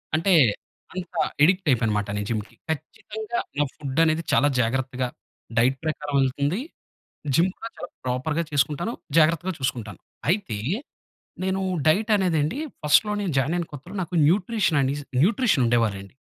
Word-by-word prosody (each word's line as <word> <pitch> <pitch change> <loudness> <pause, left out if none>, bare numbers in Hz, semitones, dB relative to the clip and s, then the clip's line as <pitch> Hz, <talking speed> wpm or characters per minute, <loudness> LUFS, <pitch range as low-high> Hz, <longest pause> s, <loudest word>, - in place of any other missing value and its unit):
అంటే 175 +4 +3 0.6
అంత 185 -1 -4 0.4
యడిక్ట్ 185 +2 +4
అయిపోయా 115 -2 +2
అన్నమాట 105 -1 0
నేను 105 0 -3
జిమ్‌కి. 110 -2 -3
ఖచ్చితంగా 215 - -4 0.2
నా - - +5
ఫుడ్ 140 +1 -3
అనేది 160 +1 +2
చాలా 145 - +5
జాగ్రత్తగా 130 +1 -1 0.5
డైట్ 130 +3 +3
ప్రకారం 150 -2 -3
వెళ్తుంది. 140 - 0 0.8
జిమ్ 175 +5 +4
కూడా 230 - -6
చాలా 175 - -6 0.2
ప్రాపర్‌గా 145 +6 -1
చేసుకుంటాను. 145 - 0 0.3
జాగ్రత్తగా 165 +3 +3
చూసుకుంటాను. 120 -6 -3 0.3
అయితే 185 - 0 0.9
నేను 190 0 0 0.3
డైట్ 215 +7 +2
అనేది 180 -5 +1
అండి. 155 - -2 0.2
ఫస్ట్‌లో 210 +8 +4
నేను 185 -6 -1
జాయిన్ 150 +7 +1
అయిన 170 - -2
కొత్తలో 160 +8 -9
నాకు 175 +1 -6
న్యూట్రిషననేసి 160 - +1 0.2
న్యూట్రిషన్ 205 - +3
ఉండేవారండి. 110 -4 0
155 Hz, 135 wpm, -24 LUFS, 130-185 Hz, 0.9 s, నా